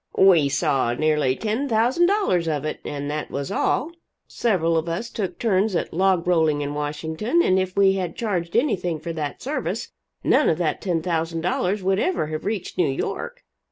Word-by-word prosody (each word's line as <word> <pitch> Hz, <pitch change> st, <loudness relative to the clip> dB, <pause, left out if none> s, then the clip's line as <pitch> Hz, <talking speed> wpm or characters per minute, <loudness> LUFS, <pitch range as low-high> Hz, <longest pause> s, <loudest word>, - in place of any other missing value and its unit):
"We 175 Hz, -7 st, +6 dB
saw 135 Hz, -4 st, +1 dB
nearly 150 Hz, -3 st, +1 dB
ten 225 Hz, -, -2 dB
thousand 245 Hz, +10 st, +3 dB
dollars 375 Hz, -, +1 dB
of 150 Hz, -2 st, -1 dB
it 155 Hz, -, -3 dB
and 145 Hz, -1 st, -4 dB
that 150 Hz, 0 st, -4 dB
was 140 Hz, 0 st, -4 dB
all. 305 Hz, +6 st, 0 dB, 0.4 s
Several 170 Hz, -8 st, +1 dB
of 165 Hz, +1 st, 0 dB
us 205 Hz, +8 st, -3 dB
took 185 Hz, -5 st, -4 dB
turns 205 Hz, -2 st, +1 dB
at -, -, -2 dB
log 185 Hz, 0 st, +2 dB
rolling 160 Hz, -4 st, +2 dB
in 145 Hz, 0 st, -3 dB
Washington, 160 Hz, -, -1 dB
and 185 Hz, 0 st, +3 dB
if 185 Hz, 0 st, -3 dB
we 195 Hz, -1 st, +5 dB
had 180 Hz, -3 st, -3 dB
charged 180 Hz, -7 st, -2 dB
anything 180 Hz, -, +1 dB
for 165 Hz, +2 st, -5 dB
that 150 Hz, -3 st, -5 dB
service, 290 Hz, +4 st, -3 dB, 0.3 s
none 300 Hz, -, +4 dB
of 160 Hz, -, +1 dB
that 165 Hz, -3 st, -1 dB
$10,000 170 Hz, +2 st, -1 dB
would 190 Hz, +1 st, +2 dB
ever 365 Hz, -, 0 dB
have 155 Hz, 0 st, -5 dB
reached 205 Hz, -3 st, -3 dB
New 165 Hz, -5 st, +3 dB
York." 135 Hz, -, -4 dB
175 Hz, 180 wpm, -23 LUFS, 155-205 Hz, 0.4 s, We